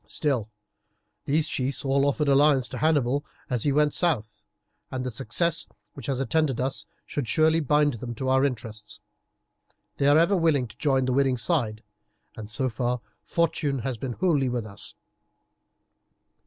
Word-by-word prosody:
Still, 125 -5 -1 0.8
these 150 +2 +2
chiefs 135 0 0
all 135 +1 +2
offered 145 +1 0
alliance 140 -2 +4
to - - -5
Hannibal 145 -3 +2 0.3
as 125 -3 0
he 145 - +3
went 150 +1 +3
south, 110 -11 0 0.5
and 130 -1 -4
the 125 - -2
success 165 +10 -1 0.3
which 135 - -9
has 135 -2 -1
attended 145 -2 +1
us 130 +1 -2 0.2
should 145 -5 -3
surely 160 +3 +3
bind 150 -1 +2
them 120 +1 -6
to 130 +3 -4
our 130 +1 +3
interests. 110 -5 -4 1.0
They 140 - +2
are 145 +1 +6
ever 170 +5 +4
willing 160 -8 +2
to 115 - -16
join 135 -1 +2
the 130 - 0
winning 135 -1 +2
side, 115 -7 0 0.5
and 105 -2 -8
so 130 +5 -1
far 125 +1 -1 0.2
fortune 155 -4 0
has 130 -3 -2
been 130 0 -3
wholly 145 -5 +1
with 120 -2 -2
us." 100 -1 -6
135 Hz, 160 wpm, -26 LUFS, 120-150 Hz, 1.0 s, are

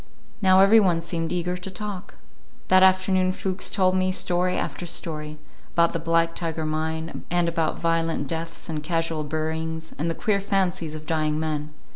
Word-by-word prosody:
Now 190 -1 +6
every 205 +3 +7
one 180 -5 +3
seemed 165 -1 -3
eager 180 0 -1
to 180 +2 -7
talk. 195 0 -7 0.5
That 185 0 +6
afternoon 185 0 +4
Fuchs 185 0 -1
told 185 -2 +2
me 185 0 +2
story 180 0 0
after 175 - -3
story; 155 -3 -3 0.4
about 170 0 +4
the 165 - -1
Black 165 +1 +2
Tiger 160 -2 -3
mine, 160 +1 -3
and 175 0 +2
about 165 -1 0
violent 165 -3 0
deaths 165 +2 -5
and 155 -2 -3
casual 165 0 -1
buryings, 160 +1 -3
and 165 +3 0
the 165 - -2
queer 200 -2 0
fancies 190 -5 -1
of 155 0 -9
dying 155 -1 0
men. 155 -1 -3
165 Hz, 170 wpm, -24 LUFS, 160-185 Hz, 0.5 s, every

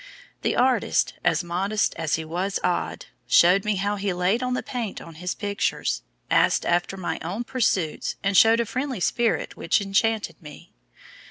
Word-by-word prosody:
The - - 0
artist, 255 0 +2
as - - +2
modest 195 +5 0
as 160 -2 0
he 160 - -5
was 180 +5 -2
odd, 175 - -1 0.2
showed 180 +3 +5
me 210 -1 0
how 200 +2 -1
he 195 -1 -1
laid 180 +7 +1
on 250 0 -1
the - - -3
paint 235 -5 -4
on 165 - -11
his 180 0 -2
pictures, 205 -1 -1 0.3
asked - - +3
after 175 +2 0
my 185 - -3
own 190 +8 -3
pursuits, 205 -10 -1
and 200 0 0
showed 225 +3 +6
a 235 - +1
friendly 260 0 -3
spirit 230 +6 0
which - - +1
enchanted 210 +2 0
me. 150 -2 -13
200 Hz, 170 wpm, -24 LUFS, 180-225 Hz, 0.3 s, showed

